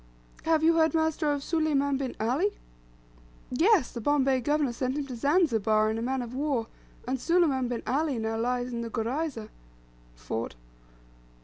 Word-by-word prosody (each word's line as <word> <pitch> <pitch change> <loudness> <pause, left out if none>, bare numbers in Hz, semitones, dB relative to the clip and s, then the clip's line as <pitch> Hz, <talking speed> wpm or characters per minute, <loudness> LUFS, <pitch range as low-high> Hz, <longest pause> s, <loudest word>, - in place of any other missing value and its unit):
"Have 320 -1 +2
you 330 +1 +4
heard, 320 0 +3
master, 320 -1 +1
of 285 -1 -2
Suleiman 285 -4 +1
bin 265 -2 -4
Ali?" 275 - 0 0.9
"Yes, 335 - +3
the 235 - -6
Bombay 270 0 +2
governor 290 -1 +1
sent 255 +3 -2
him 290 - -2
to 260 -3 -7
Zanzibar, 225 - +2
in 220 - -2
a - - -3
man 255 +1 -1
of 240 0 -8
war, 270 -4 -1 0.4
and 260 +1 -1
Suleiman 315 -7 +2
bin 240 -1 -4
Ali 285 0 0
now 225 0 -2
lies 245 +1 -1
in 235 - -3
the 230 - -4
gurayza 235 +1 -3 0.7
(fort)." 110 - -5
265 Hz, 165 wpm, -28 LUFS, 235-310 Hz, 0.9 s, you